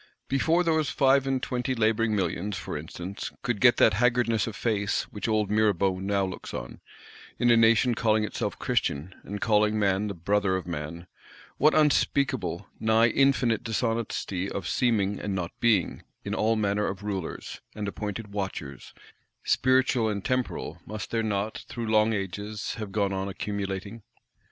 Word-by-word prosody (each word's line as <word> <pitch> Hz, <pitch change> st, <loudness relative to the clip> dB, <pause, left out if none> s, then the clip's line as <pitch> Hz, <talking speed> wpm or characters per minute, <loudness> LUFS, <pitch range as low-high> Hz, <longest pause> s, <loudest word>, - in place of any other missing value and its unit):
Before 160 Hz, +6 st, +2 dB
those 160 Hz, -3 st, +1 dB
five 135 Hz, -1 st, +3 dB
and 130 Hz, -1 st, 0 dB
twenty 125 Hz, +1 st, -1 dB
labouring 110 Hz, -1 st, +2 dB
Millions, 95 Hz, +1 st, -1 dB
for 85 Hz, -, -5 dB
instance, 85 Hz, +5 st, -6 dB
could 120 Hz, -4 st, -1 dB
get 120 Hz, -2 st, +6 dB
that 110 Hz, -, +5 dB
haggardness 115 Hz, 0 st, +2 dB
of 110 Hz, -, -5 dB
face, 105 Hz, -3 st, 0 dB
which 105 Hz, -, -4 dB
old 105 Hz, -2 st, +1 dB
Mirabeau 100 Hz, -3 st, +2 dB
now 100 Hz, 0 st, 0 dB
looks 95 Hz, -, -7 dB
on, -, -, -7 dB, 0.6 s
in 120 Hz, 0 st, +3 dB
a -, -, +7 dB
Nation 115 Hz, +2 st, +4 dB
calling 110 Hz, -1 st, +2 dB
itself 105 Hz, -, -3 dB
Christian, 75 Hz, +7 st, -1 dB
and 100 Hz, +1 st, -6 dB
calling 105 Hz, 0 st, +2 dB
man 100 Hz, 0 st, +1 dB
the 100 Hz, -, -4 dB
brother 100 Hz, +2 st, +1 dB
of 95 Hz, -, -3 dB
man,—what 85 Hz, -, -3 dB
unspeakable, 135 Hz, -, +1 dB
nigh 110 Hz, +1 st, +4 dB
infinite 125 Hz, -3 st, +2 dB
Dishonesty 115 Hz, -5 st, -2 dB
(of 95 Hz, -3 st, -4 dB
seeming 105 Hz, -5 st, +1 dB
and 100 Hz, -2 st, -3 dB
not 90 Hz, -3 st, -3 dB
being) 110 Hz, -7 st, +2 dB, 0.2 s
in -, -, -3 dB
all 110 Hz, +1 st, +2 dB
manner 105 Hz, -1 st, 0 dB
of 95 Hz, +1 st, -5 dB
Rulers, 95 Hz, -5 st, -5 dB
and 105 Hz, -1 st, -4 dB
appointed 105 Hz, +1 st, -5 dB
Watchers, 90 Hz, -9 st, -5 dB, 0.5 s
spiritual 130 Hz, -3 st, +2 dB
and 100 Hz, -2 st, -3 dB
temporal, 125 Hz, -10 st, -2 dB
must 110 Hz, 0 st, -7 dB
there 115 Hz, -, +1 dB
not, 105 Hz, 0 st, -2 dB
through 120 Hz, -1 st, -4 dB
long 110 Hz, 0 st, +3 dB
ages, 105 Hz, +1 st, -4 dB
have 105 Hz, -3 st, -5 dB
gone 100 Hz, -1 st, 0 dB
on 95 Hz, +1 st, -2 dB
accumulating! 100 Hz, +2 st, -4 dB
105 Hz, 155 wpm, -27 LUFS, 95-115 Hz, 0.6 s, a